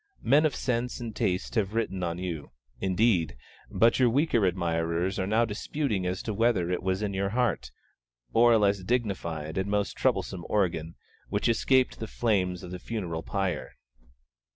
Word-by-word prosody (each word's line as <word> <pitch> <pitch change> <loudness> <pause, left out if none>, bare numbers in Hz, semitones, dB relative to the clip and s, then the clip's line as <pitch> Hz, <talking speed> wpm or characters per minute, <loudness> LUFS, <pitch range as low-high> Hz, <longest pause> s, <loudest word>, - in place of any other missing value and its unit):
Men 150 +5 +5
of 145 - -5
sense 125 -1 -1
and 115 -3 -6
taste 90 +1 -1
have 105 -3 0
written 95 -5 -1
on 85 -1 -2
you, 90 -5 -5 0.3
indeed; 95 - +1 0.3
but 115 +3 +3
your 125 -2 +5
weaker 120 - +2
admirers 85 +1 -1
are 95 - -1
now 110 +3 +3
disputing 105 -2 -2
as 90 +1 -3
to 110 - -3
whether 100 -5 +2
it 90 - -1
was 95 +2 -1
your 100 -1 -1
heart, 120 -2 0 0.6
or 120 +1 +6
a - - +6
less 100 -1 +2
dignified 90 -8 -2
and 95 +1 -2
most 100 -2 0
troublesome 90 -2 0
organ, 85 -5 0 0.3
which 100 - 0
escaped 130 +2 +2
the 110 - -4
flames 95 -7 0
of 90 - -8
the 90 - -5
funeral 90 -7 -4
pyre. 95 +1 -3
100 Hz, 165 wpm, -28 LUFS, 90-115 Hz, 0.6 s, or